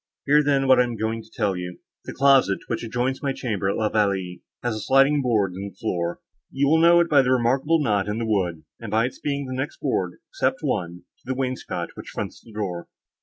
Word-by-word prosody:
Hear, 150 +2 +5
then, 140 -2 +2
what 130 -1 +6
I - - +6
am 120 -1 -4
going 110 +1 -2
to - - -18
tell 105 -4 -1
you. 90 0 -6 0.3
The - - -6
closet, 135 -7 +4
which - - -3
adjoins 125 +3 -2
my 140 -2 -1
chamber 105 -8 -2
at - - 0
La 110 - +1
Vallée, 100 -4 0 0.2
has 120 -2 -1
a - - -4
sliding 135 +6 +4
board 110 -7 +1
in 100 +2 -6
the 95 - -21
floor. 85 -2 -3 0.3
You 140 +1 0
will 160 +1 +4
know 170 +1 +7
it 170 - +1
by 150 -3 +5
a - - +5
remarkable 130 +6 +2
knot 105 -5 +1
in 105 +1 -2
the 115 - -2
wood, 90 -7 -1 0.2
and 115 - -7
by 110 +3 +2
its 125 - -6
being 140 -1 -2
the 130 - -5
next 135 +3 -4
board, 95 -10 -1 0.2
except - - -1
one, 85 +1 -2 0.2
to - - -36
the 130 - -2
wainscot, 130 -1 -3
which - - -9
fronts - - -6
the 115 - -15
door. 95 -5 -4
115 Hz, 235 wpm, -24 LUFS, 100-135 Hz, 0.3 s, know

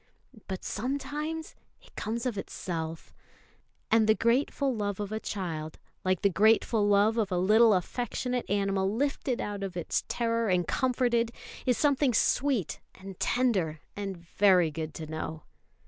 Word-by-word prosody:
But 190 -2 -5
sometimes 290 +7 -3 0.3
it - - -22
comes 230 +3 -3
of 245 -4 -1
itself; 165 -4 -5 0.8
and 220 -1 +5
the 215 - +5
grateful 260 +4 +1
love 205 -3 -2
of 205 0 -4
a 215 - -2
child, 160 -8 -4 0.3
like 185 -2 0
the 200 - +5
grateful 215 +2 +3
love 205 +3 +4
of 205 -3 0
a 180 - +1
little 215 +4 +5
affectionate 245 +5 -2
animal 195 -1 +1
lifted 265 +1 -1
out 205 -1 -4
of 190 -2 -4
its 175 - -1
terror 230 -2 0
and 180 -2 +2
comforted, 240 -2 +1 0.4
is 250 - +3
something 280 -4 +2
sweet 250 - +1 0.2
and 190 -1 -10
tender 195 -11 +1 0.2
and 195 -2 -4
very 180 0 +3
good 155 0 -5
to 160 - -5
know. 155 0 -5
205 Hz, 145 wpm, -29 LUFS, 185-240 Hz, 0.8 s, and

